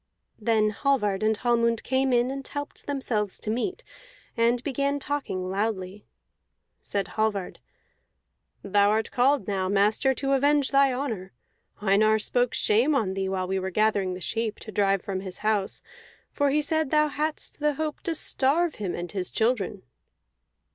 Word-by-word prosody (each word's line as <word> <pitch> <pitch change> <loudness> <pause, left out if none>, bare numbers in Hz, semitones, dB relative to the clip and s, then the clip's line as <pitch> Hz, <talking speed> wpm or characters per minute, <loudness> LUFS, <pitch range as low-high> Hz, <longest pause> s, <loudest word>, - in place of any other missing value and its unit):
Then 215 -1 +2
Hallvard 210 -5 0
and 215 0 +2
Hallmund 235 -1 +1
came 265 0 +1
in 245 +1 +2
and 275 0 -6
helped 285 0 -7
themselves 230 -8 -1
to 215 - -3
meat, 365 - -2 0.5
and 235 +1 +2
began 280 0 0
talking 270 -11 -3
loudly. 200 -1 -3 0.7
Said 200 -2 -3
Hallvard, 215 -4 -2 1.0
"Thou 200 +1 +3
art 220 +1 0
called 255 -3 +2
now, 190 -2 -1
master, 210 +7 +2
to 275 +1 -2
avenge 285 +1 +3
thy 275 -1 +5
honor. 225 -8 -4 0.5
Einar 215 +2 +4
spoke 245 +3 0
shame 240 +8 +3
on 210 -8 0
thee 190 0 -2
while 185 -1 -2
we 190 +1 -1
were 190 0 -3
gathering 200 -2 +1
the 185 - -9
sheep 225 +2 -2
to 215 - -8
drive 195 -2 +1
from 195 -1 -3
his 185 -1 -7
house, 210 -3 0 0.5
for 285 -1 +1
he 300 +2 +2
said 315 -1 +1
thou 305 0 +3
hadst 300 +1 -3
the 300 -1 +1
hope 310 +1 -3
to 335 - -2
starve 305 +3 +1
him 190 -4 -2
and 175 0 -5
his 185 -3 -3
children." 220 -4 0
225 Hz, 160 wpm, -26 LUFS, 200-275 Hz, 1.0 s, thy